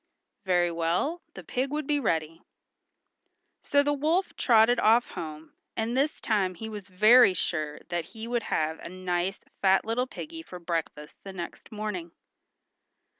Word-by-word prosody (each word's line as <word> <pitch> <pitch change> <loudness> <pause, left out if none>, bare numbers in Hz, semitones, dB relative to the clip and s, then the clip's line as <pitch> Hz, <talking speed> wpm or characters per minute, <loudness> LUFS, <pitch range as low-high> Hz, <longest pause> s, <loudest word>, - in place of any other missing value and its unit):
Very 175 -2 +2
well; 170 - 0
the - - -8
pig 260 +2 -2
would 300 +1 -2
be 290 +1 +1
ready. 165 - -1 1.2
So 285 0 +3
the 290 0 +1
wolf 315 +7 0
trotted 235 0 +4
off 230 +2 +4
home, 155 -1 -7 0.2
and 225 +2 -1
this 285 +4 +1
time 195 -5 0
he 220 +6 -6
was 205 -3 -8
very 215 +2 +6
sure 155 -4 -2
that 175 -2 -2
he 220 +5 -8
would 240 0 0
have 160 +1 0
a - - -8
nice 185 +1 -2 0.2
fat 190 -1 +4
little 240 +3 0
piggy 325 +5 -8
for 185 - -10
breakfast 165 -3 -4
the 195 - -8
next 175 -2 -8
morning. 210 -6 -4
200 Hz, 155 wpm, -28 LUFS, 170-245 Hz, 1.2 s, very